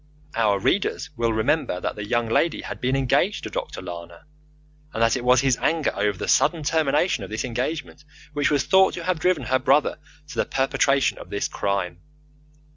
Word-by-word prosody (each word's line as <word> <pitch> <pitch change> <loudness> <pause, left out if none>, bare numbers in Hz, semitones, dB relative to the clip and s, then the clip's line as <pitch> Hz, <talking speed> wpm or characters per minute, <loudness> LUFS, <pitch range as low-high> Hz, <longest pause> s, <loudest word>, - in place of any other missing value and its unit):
Our 105 -3 +2
readers 145 - 0
will 115 -1 0
remember 110 - 0
that - - -3
the 105 - -5
young 120 +2 0
lady 160 +8 +1
had - - -7
been 130 +1 +1
engaged 135 -3 +1
to - - -6
Dr. - - -5
Lana, 85 0 -9 0.7
and 115 - 0
that 115 - +3
it 130 - -3
was 125 0 +5
his 130 -2 +2
anger 160 -2 +1
over 105 -2 0
the - - -4
sudden 165 -3 +3
termination 150 - +1
of 95 - -7
this 110 +4 -3
engagement 130 +6 -4 0.3
which 145 -1 +1
was 145 -3 +2
thought 190 0 +4
to 170 - -6
have 180 -1 -1
driven 175 -4 +1
her 130 +3 +1
brother 150 +2 +2 0.3
to - - -9
the - - +2
perpetration 135 +1 +1
of - - -11
this 100 - -2
crime. 95 -4 -2
130 Hz, 195 wpm, -24 LUFS, 110-150 Hz, 0.7 s, was